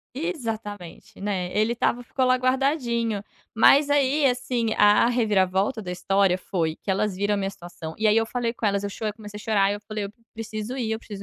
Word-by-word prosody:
Exatamente, 225 - -5
né, 190 -3 -2
ele 215 +2 +2
estava 240 +1 0
ficou 255 +1 -1
lá 255 0 +4
guardadinho. 255 -5 0 0.3
Mas 280 +6 +6
aí, 285 0 +3
assim, 245 -2 0
a 205 +2 +5
reviravolta 210 -1 +1
da 185 -4 -6
história 190 +1 +2
foi 165 -4 -2
que - - -5
elas 195 0 0
viram 205 +2 0
a - - 0
minha 195 -1 -1
situação, 175 -4 -9
e 220 - +1
aí, 210 - +5
eu 225 0 +3
falei 235 0 -2
com 230 - -3
elas, 200 0 0
eu 200 - -3
chorei, 215 +1 -3
comecei 210 -2 -10
a - - -10
chorar, 200 -2 +2
eu 205 - -5
falei: 210 -1 -5 0.3
"Preciso 220 +2 -5
ir, 235 -4 -2
eu 220 - -2
preciso 205 -3 -9
215 Hz, 205 wpm, -25 LUFS, 200-245 Hz, 0.3 s, Mas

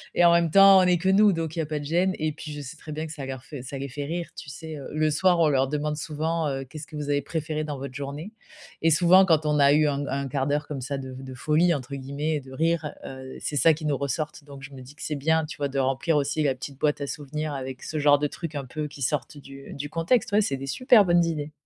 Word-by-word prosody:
et 175 - +5
en 170 - +7
même 170 -1 +3
temps, 195 0 +8
on - - +5
est 180 -1 +3
que 185 +3 -3
nous, 200 +2 +6
donc 165 -1 -3
il - - -3
y - - +3
a - - -2
pas 155 -1 -3
de - - -7
gêne 180 +5 +1
et 155 0 0
puis 150 0 -8
je 150 - -6
sais 130 - -8
très 155 - -10
bien 155 +1 -4
que 155 - -8
ça 140 -3 -6
leur 130 -1 -6
fait 145 -5 -8
ça 135 +2 -7
les 140 +1 -4
fait 145 +3 -5
rire. 170 +2 -3
Tu 145 - -9
sais, 160 +2 -8
heu, 140 - -8
le 155 +1 +1
soir, 180 +2 +3
on 160 - +5
leur 135 -1 +2
demande 150 0 -1
souvent: 155 +1 -2
«Heu, 135 0 -3
qu'est 155 +3 -9
que 155 - -12
vous 145 -1 -4
avez 145 0 +2
préféré 155 +1 -3
dans 145 -2 -4
votre 135 -1 -7
journée?» 145 +8 -6 0.5
et 165 - +4
souvent, 175 +4 +6
quand 160 -3 +3
on 150 -1 +2
a 140 0 +6
eu 150 0 +4
un 140 0 -1
un 140 0 -2
quart 135 +1 -1
d'heure 145 +1 0
comme 140 -3 -5
ça 140 +2 -3
«de 130 -1 -7
de 130 0 -8
folie» 160 +6 +2
entre 140 0 -7
guillemets 145 +3 -2
de 130 0 -14
rire, 160 +1 0
heu, 130 0 -8
c'est 150 - -4
ça 160 +3 +5
qui 155 -1 -8
nous 145 -2 +1
ressortent. 145 +2 -3
Donc 140 -1 -11
je 140 0 -10
me 130 - -10
dis 135 +4 -13
que - - -10
c'est 150 - -2
bien, 160 +3 +1
tu 150 - -9
vois? 145 -1 -1
De 135 0 -5
remplir 135 +5 0
aussi 145 +2 0
la 135 -2 +1
petite 135 +1 -9
boîte 150 -1 +1
à 140 - -2
souvenirs 150 +1 -4
avec 130 -1 -6
ce 155 - -3
genre 145 0 +5
de 145 - -1
trucs 160 0 -7
un 140 -2 -3
peu 150 +4 -4
qui 140 -1 -12
sortent 145 +1 -2
du 140 -1 -11
du 145 +1 -5
contexte, 180 +7 +1
ouais. 210 +1 +4
C'est 135 -8 -1
des 135 - -6
super 235 - +5
bonnes 175 -1 +4
idées. 150 -2 -3
150 Hz, 295 wpm, -25 LUFS, 140-160 Hz, 0.5 s, temps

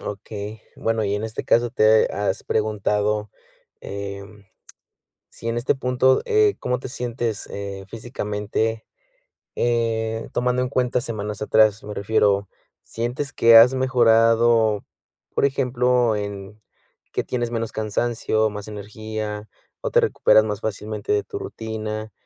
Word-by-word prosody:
Okey, 105 +1 -7
bueno 115 -1 0
y 100 - 0
en 105 - -2
este 110 -1 -5
caso, 120 +1 +3
¿te 110 -2 +4
has 100 -1 -2
preguntado, 105 -1 0 0.5
em, 100 +1 -7 0.9
si 115 - -9
en 115 - -1
este 120 +4 +1
punto, 130 0 +2
eh, 430 -2 +3
cómo 125 0 -1
te 130 - -7
sientes, 120 -3 -3
eh, 100 -1 -6
físicamente? 110 -1 -3 0.7
Eh, 115 -1 -1
tomando 125 +1 +1
en 125 - -1
cuenta 125 -2 0
semanas 105 -3 -5
atrás, 110 0 +3
me 105 - -6
refiero, 100 -1 +1 0.3
¿sientes 125 +5 -4
que 115 0 +6
has 120 +3 +8
mejorado, 115 -3 +3 0.5
por - - +3
ejemplo, 125 -4 +2
en 100 0 -6 0.5
que - - 0
tienes 120 -2 -3
menos 115 -1 -2
cansancio, 110 0 0
más 105 0 -7
energía, 105 0 -6 0.3
o - - -2
te - - +6
recuperas 110 - +4
más 105 -2 -3
fácilmente 105 0 -3
de 105 - +2
tu - - -7
rutina, 110 -1 -5
110 Hz, 130 wpm, -23 LUFS, 105-120 Hz, 0.9 s, has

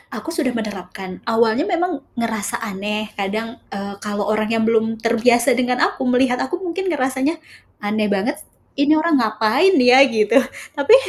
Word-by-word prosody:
aku - - -6
sudah 300 -7 -1
menerapkan. 190 -4 -6
Awalnya 230 +5 +2
memang 350 -4 -1 0.2
ngerasa 220 -3 -2
aneh 210 +1 -4
kadang, 220 +4 -3
eee, 200 0 -5
kalo 205 -1 -2
orangnya 215 +1 0
belum 225 0 +1
terbiasa 235 +1 +3
dengan 250 0 0
aku, - - -10
melihat 250 0 +2
aku 265 - -2
mungkin 375 +2 -3
ngerasanya, 265 0 0 0.5
"Aneh 210 +1 0
banget 210 +9 -1
s - - -13 0.4
ini 290 +2 +4
orang 325 0 +2
ngapain 225 - +2
ya?" 250 0 +6
Gitu, 220 -2 +1 0.4
tapi 290 - +6
230 Hz, 150 wpm, -20 LUFS, 215-270 Hz, 0.5 s, ya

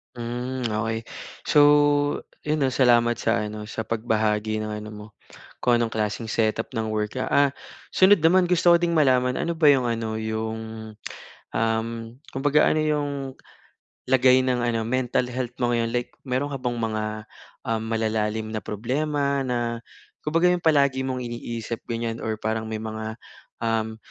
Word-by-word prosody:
Hmm 125 +2 -4
okey. 110 +1 -2 0.4
So 150 - +3 0.9
'yon 150 -1 +1
oh, 130 - +2
salamat 120 -2 +3
sa 105 - +1
ano 105 0 -6
sa 110 0 -4
pagbahagi 110 -1 0
ng 110 - -4
ano 105 - -8
mo 105 -1 -9 0.5
kung 120 - +3
anong 115 -1 0
klaseng 110 +1 -2
setup 110 +1 0
ng 110 -2 -2
work 110 +3 -2
ka, - - -1
ah 140 -1 +3 0.4
sunod 190 -3 +5
naman 180 +2 +5
gusto 175 0 +4
ko 170 - +7
din 170 -1 0
malaman, 125 -4 +3
ano 170 - -1
ba 155 - +5
'yong 135 -3 +6
ano 115 -1 -3
'yong 110 0 -3 1.0
um 110 0 +1 0.4
kumbaga 145 +2 +3
ano 155 - +1
'yong 150 -2 0 1.0
lagay 130 0 +5
ng 125 -1 +1
ano 115 -1 0
mental 125 0 0
health 125 -1 -4
mo 120 - +2
ngayon. 115 -1 0
Like 120 0 -2
meron 130 +2 -1
ka - - -2
bang 120 -1 -2
mga, 110 -1 -1 0.7
um, 115 -1 0
malalalim 110 -1 -1
na - - -1
problema 140 +5 -1
na, 120 -2 -2 0.4
kumbaga 165 +4 +3
yung 180 -1 -1
palagi 140 -4 +3
mong 130 -1 -2
iniisip 120 -1 -5
ganiyan 115 0 -2
or 110 - -1
parang 110 0 -1
may 110 -1 -3
mga, 110 0 -5 0.5
um, 110 -1 -1
120 Hz, 160 wpm, -24 LUFS, 110-130 Hz, 1.0 s, ko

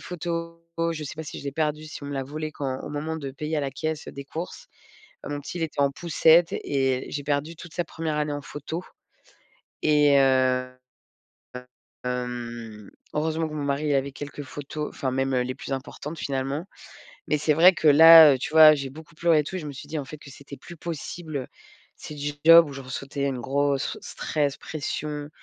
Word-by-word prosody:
photos 170 -1 -5 0.3
je 155 - -6
sais 140 - -6
pas 160 - -6
si - - -7
je - - -12
l'ai 140 - -2
perdu, 155 0 -1
si 155 - -9
on - - -6
me 145 - -5
l'a 135 - -2
volé 155 +3 -5
quand 135 -4 -4
au - - -7
moment 150 +2 -3
de 140 -4 -5
payer 155 +3 -3
à - - +1
la 140 -1 -2
caisse 155 +2 -4
des 140 0 -8
courses. 175 - -7 0.6
Mon 145 0 -4
petit, 145 - -7
il 165 - -1
était 150 -3 -2
en 140 - +4
poussette 165 +2 +4
et 135 -2 -1
j'ai 145 - -4
perdu 145 +3 -1
toute 165 +1 -12
sa 175 - -1
1re 160 -1 -4
année 150 -1 -1
en 145 - -4
photo 160 +4 -6 1.0
et 150 -2 +5
heu 130 -1 +3 1.4
heu, - - +1
hem, 120 -4 -5 0.2
heureusement 160 +1 0
que 155 - -9
mon 150 - -3
mari 145 +1 0
avait 135 0 0
quelques 145 +1 -7
photos 145 +2 -6
enfin 130 - -3
même 135 +1 0
les 125 0 0
plus - - -7
importantes 145 +3 -6
finalement. 135 +4 -2 0.6
Mais 150 - +2
c'est 150 +1 +2
vrai 175 +5 +7
que 160 - -3
là, 160 0 +10
heu, - - -3
tu - - -4
vois, 155 -1 +9
j'ai 135 -2 -4
beaucoup 160 +3 -13
pleuré 165 -2 +3
tout 185 - -5
et - - -2
je 155 - -7
me 145 - -5
suis 140 +2 -10
dit 155 +1 -3
en 145 - -4
fait 150 +3 -10
que 145 - -14
c'était 140 +1 -11
plus 170 - -12
possible. 155 -3 -5 0.5
C'est - - -9
du 145 0 -3
job 165 -1 +9
où - - -8
je 135 - -7
ressentais 140 +2 -4
une 130 -3 -2
grosse 140 +2 0
stress, 145 -3 -2
pression, 150 -1 -4
145 Hz, 210 wpm, -25 LUFS, 135-160 Hz, 1.4 s, là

